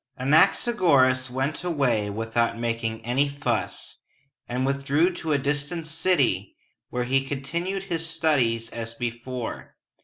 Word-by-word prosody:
Anaxagoras 135 - +4
went 135 +6 -2
away 130 -12 +1
without 115 +2 -1
making 115 -1 -3
any 135 +4 +2
fuss, 140 0 -3 0.5
and 125 +2 -1
withdrew 140 +6 +1
to 160 - -3
a 145 - +4
distant 145 +4 -1
city, 150 - +1 0.3
where 125 0 -1
he 135 +2 +2
continued 170 +8 -3
his 165 -4 -2
studies 130 -9 +1
as 115 0 -5
before. 120 0 -5
135 Hz, 120 wpm, -25 LUFS, 120-155 Hz, 0.5 s, Anaxagoras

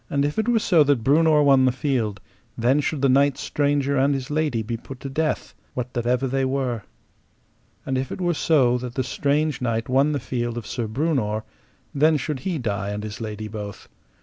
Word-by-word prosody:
And 140 0 +1
if 145 +7 -1
it 220 - 0
were 240 - +4
so 175 -7 +4
that 140 -5 +2
Breunor 150 +3 +4
won 135 -2 +5
the 130 - +4
field, 120 -7 -1 0.4
then 125 +5 +3
should 145 -1 -2
the - - +6
knight 135 +1 +3
stranger 140 -1 0
and 140 +2 +3
his 135 +1 -5
lady 145 -7 0
be 115 +2 -3
put 125 +3 -9
to 135 - -5
death, 155 +3 -2 0.2
what 125 0 -4
that 120 -1 -2
ever 125 +2 +2
they 135 +1 0
were; 130 -4 -1 1.0
and 130 -1 0
if 130 - -4
it - - -5
were 175 -1 +1
so 130 -6 +3
that 125 0 -7
the 130 - 0
strange 145 +1 0
knight 115 -2 -1
won 135 +3 +3
the 145 - -1
field 120 -2 -3
of 115 - -5
Sir 120 0 -3
Breunor, 110 -4 -1 0.5
then 155 +2 +4
should 145 0 -3
he 180 0 -2
die 100 -6 -2
and 105 +1 -4
his 110 +1 -6
lady 110 -1 -5
both. 105 -2 -7
130 Hz, 210 wpm, -23 LUFS, 120-145 Hz, 1.0 s, the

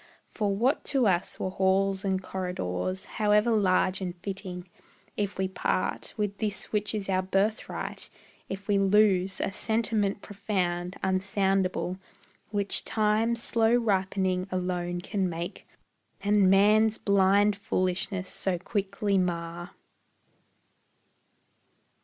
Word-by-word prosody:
For 210 -3 -2
what 245 +7 +1
to 270 -4 +2
us 180 -3 0
were 185 - -2
halls 190 +1 +1
and 190 -1 0
corridors 180 - -3 0.2
However 210 +2 +4
large 190 -3 +2
and 180 -2 -3
fitting, 185 -1 -6 0.5
if 205 -1 -2
we 190 0 0
part 185 0 -2
With 205 -2 -2
this 210 -2 -3
which 210 0 0
is 205 -2 -3
our 185 -1 +1
birthright; 195 +4 -2 0.4
if 195 +1 -6
we 205 -1 +3
lose 195 -1 +3
A - - -1
sentiment 215 -2 0
profound, 185 -3 -2
unsoundable, 190 -1 0 0.5
Which 205 -1 -1
Time's 225 +2 +1
slow 230 0 +3
ripening 190 -4 0
alone 180 -1 -2
can 190 0 -1
make, 170 +3 -6 0.5
And 200 -1 +3
man's 210 +3 +5
blind 200 +1 +3
foolishness 185 -1 -1
so 185 -1 -1
quickly 200 +1 -1
mar. 175 -1 -3
195 Hz, 115 wpm, -28 LUFS, 185-210 Hz, 0.5 s, man's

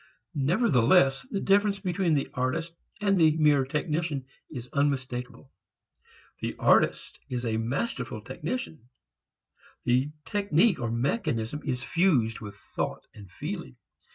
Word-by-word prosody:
Nevertheless 140 - +3
the 200 - -2
difference 200 +1 +3
between 180 -3 +1
the 140 - -1
artist 160 +7 -1 0.3
and 195 -3 +3
the 155 -1 +5
mere 150 -3 +4
technician 150 0 -2 0.2
is 125 -5 -7
unmistakeable. 130 -2 -2 0.9
The - - -3
artist - - +2
is 125 -1 -3
a 110 -1 0
masterful 130 - -2
technician. 160 - -5 0.9
The 125 +3 +2 0.2
technique 200 -2 +2
or 120 -2 -2
mechanism 120 - -1
is 130 -3 -2
fused 135 -12 +2
with 105 -3 -8
thought 105 - -4
and 100 -3 -12
feeling. 65 -6 -6
140 Hz, 120 wpm, -28 LUFS, 125-175 Hz, 0.9 s, the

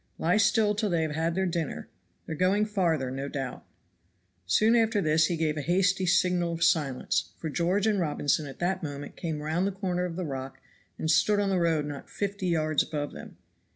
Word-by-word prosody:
Lie 175 +5 +2
still 210 0 +3
till 210 0 -1
they 170 -3 +1
have 155 -1 -2
had 165 +2 -1
their 190 0 +1
dinner; 170 -3 -3 0.4
they - - -5
are - - -4
going 190 +6 +2
farther, 170 -11 0
no 135 +1 -4
doubt." 135 -2 -5 0.8
Soon 220 - +4
after 225 -2 +3
this 155 -3 +3
he 170 - -1
gave 155 -1 0
a - - -1
hasty 185 +4 +1
signal 175 -1 +2
of 165 0 -2
silence, 145 -6 +1
for 160 - -5
George 180 +6 +1
and 215 -3 +2
Robinson 150 -2 0
at 135 - -9
that 185 +2 -1
moment 145 -3 -6
came 155 -3 -4
round 165 +5 0
the - - -1
corner 185 -2 -2
of 170 -2 -5
the 180 0 -3
rock 135 -2 -5 0.4
and 160 - 0
stood 205 +6 +3
on 200 -1 +1
the 185 - +2
road 165 -3 +1
not 145 -1 -7
fifty 200 -1 -3
yards 155 -3 +2
above 145 -2 -3
them. - - -11
170 Hz, 210 wpm, -28 LUFS, 155-190 Hz, 0.8 s, Soon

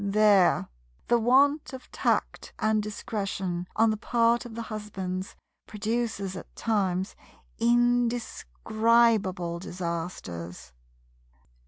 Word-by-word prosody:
There 200 - +4 0.4
the 240 - +4
want 275 +6 +3
of 260 - -10
tact - - -1
and 215 0 +1
discretion 195 -4 -4
on 225 0 +4
the 215 - -2
part 235 +2 +2
of 225 - -11
the 230 - -4
husbands 195 -4 -5 0.3
produces 220 -3 -2
at - - -10
times 195 -4 -1 0.4
indescribable 230 - +1
disasters. 165 - -6
215 Hz, 95 wpm, -27 LUFS, 185-230 Hz, 0.4 s, There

